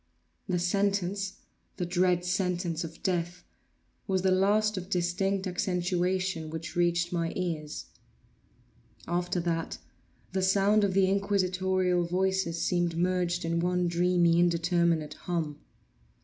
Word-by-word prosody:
The 180 Hz, -, +1 dB
sentence—the 195 Hz, 0 st, -2 dB
dread 180 Hz, 0 st, +1 dB
sentence 180 Hz, -2 st, -1 dB
of 165 Hz, 0 st, -9 dB
death—was 180 Hz, +1 st, -4 dB
the 190 Hz, -, +3 dB
last 210 Hz, +3 st, +3 dB
of 185 Hz, -1 st, -6 dB
distinct 190 Hz, +2 st, 0 dB
accentuation 180 Hz, -2 st, -1 dB
which 160 Hz, +1 st, -6 dB
reached 175 Hz, 0 st, +1 dB
my 170 Hz, -1 st, 0 dB
ears. 160 Hz, -5 st, -3 dB, 1.2 s
After 175 Hz, +1 st, -1 dB
that, 165 Hz, -1 st, -2 dB, 0.5 s
the 190 Hz, -, -1 dB
sound 200 Hz, +3 st, +3 dB
of 195 Hz, -2 st, +1 dB
the 195 Hz, -1 st, +4 dB
inquisitorial 185 Hz, -2 st, +1 dB
voices 185 Hz, -1 st, 0 dB
seemed 175 Hz, -2 st, 0 dB
merged 180 Hz, -1 st, 0 dB
in 165 Hz, 0 st, 0 dB
one 180 Hz, +1 st, +1 dB
dreamy 170 Hz, 0 st, +3 dB
indeterminate 170 Hz, -2 st, +2 dB
hum. 155 Hz, -4 st, -3 dB
180 Hz, 110 wpm, -29 LUFS, 170-190 Hz, 1.2 s, the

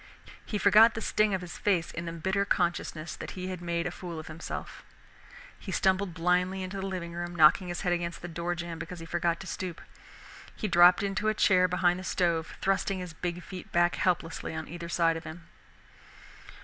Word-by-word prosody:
He 210 Hz, -, -3 dB
forgot 215 Hz, +3 st, +6 dB
the -, -, -2 dB
sting 215 Hz, -2 st, +2 dB
of 185 Hz, -, -4 dB
his 180 Hz, -1 st, -8 dB
face 180 Hz, -5 st, +1 dB
in 170 Hz, -, -5 dB
the 165 Hz, -, -4 dB
bitter 190 Hz, +4 st, 0 dB
consciousness 170 Hz, -4 st, -1 dB
that -, -, -8 dB
he 185 Hz, 0 st, -4 dB
had 185 Hz, -2 st, -5 dB
made 170 Hz, -1 st, -1 dB
a 180 Hz, -, -2 dB
fool 175 Hz, -2 st, -7 dB
of 155 Hz, -, -7 dB
himself 160 Hz, +1 st, -7 dB, 0.8 s
He 195 Hz, -, -7 dB
stumbled 190 Hz, -1 st, +1 dB
blindly 180 Hz, +2 st, +1 dB
into 185 Hz, +2 st, -5 dB
the 195 Hz, -, -3 dB
living 175 Hz, -3 st, -5 dB
room, 175 Hz, 0 st, -5 dB
knocking 160 Hz, +3 st, +6 dB
his 175 Hz, 0 st, -4 dB
head 180 Hz, -, +1 dB
against 170 Hz, -1 st, -3 dB
the -, -, -4 dB
door 170 Hz, +1 st, -3 dB
jamb 170 Hz, -1 st, -6 dB
because 170 Hz, +2 st, -6 dB
he 165 Hz, -, -8 dB
forgot 170 Hz, 0 st, 0 dB
to -, -, -8 dB
stoop. 180 Hz, -2 st, -5 dB, 0.8 s
He 215 Hz, -, -2 dB
dropped 175 Hz, +1 st, +6 dB
into 200 Hz, +2 st, -1 dB
a 215 Hz, -, +2 dB
chair 185 Hz, -3 st, +4 dB
behind 180 Hz, 0 st, +2 dB
the -, -, -7 dB
stove, 170 Hz, -3 st, 0 dB
thrusting 195 Hz, 0 st, +1 dB
his 180 Hz, -3 st, -6 dB
big 175 Hz, +2 st, -4 dB
feet 185 Hz, -2 st, -9 dB
back 175 Hz, 0 st, +3 dB
helplessly 170 Hz, -3 st, -1 dB
on 160 Hz, 0 st, -5 dB
either 170 Hz, 0 st, -7 dB
side 165 Hz, -2 st, +2 dB
of 165 Hz, -, -8 dB
him. 165 Hz, +1 st, -9 dB
175 Hz, 205 wpm, -29 LUFS, 170-185 Hz, 0.8 s, forgot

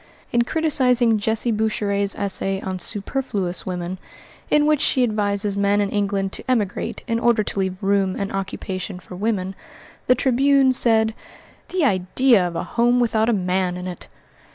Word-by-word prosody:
In 240 Hz, -, +3 dB
criticising 250 Hz, -5 st, +2 dB
Jessie 220 Hz, +3 st, 0 dB
Boucherett's 205 Hz, -2 st, 0 dB
essay 195 Hz, -1 st, -2 dB
on 185 Hz, -1 st, -4 dB
"Superfluous 200 Hz, -3 st, -3 dB
Women," 180 Hz, 0 st, -4 dB, 0.5 s
in 295 Hz, 0 st, +3 dB
which 300 Hz, -2 st, +2 dB
she 255 Hz, -, +4 dB
advises 205 Hz, -3 st, 0 dB
men 200 Hz, 0 st, +2 dB
in 200 Hz, -1 st, 0 dB
England 200 Hz, -2 st, -1 dB
to -, -, -8 dB
emigrate 215 Hz, -6 st, -1 dB
in 230 Hz, 0 st, -1 dB
order 235 Hz, -2 st, +2 dB
to 200 Hz, -, -4 dB
leave 190 Hz, +1 st, -3 dB
room 195 Hz, -1 st, +1 dB
and 200 Hz, -1 st, -3 dB
occupation 190 Hz, -1 st, -4 dB
for 180 Hz, 0 st, -11 dB
women, 195 Hz, -2 st, -2 dB, 0.5 s
the 250 Hz, -, +5 dB
Tribune 265 Hz, +1 st, +3 dB
said: 225 Hz, -3 st, +4 dB, 0.6 s
"The 365 Hz, -5 st, +1 dB
idea 195 Hz, +1 st, +3 dB
of 170 Hz, -, -7 dB
a -, -, -2 dB
home 240 Hz, +1 st, +1 dB
without 225 Hz, -2 st, +1 dB
a -, -, +4 dB
man 185 Hz, -3 st, 0 dB
in 180 Hz, -, -6 dB
it!" 180 Hz, -2 st, -7 dB
205 Hz, 160 wpm, -21 LUFS, 190-240 Hz, 0.6 s, the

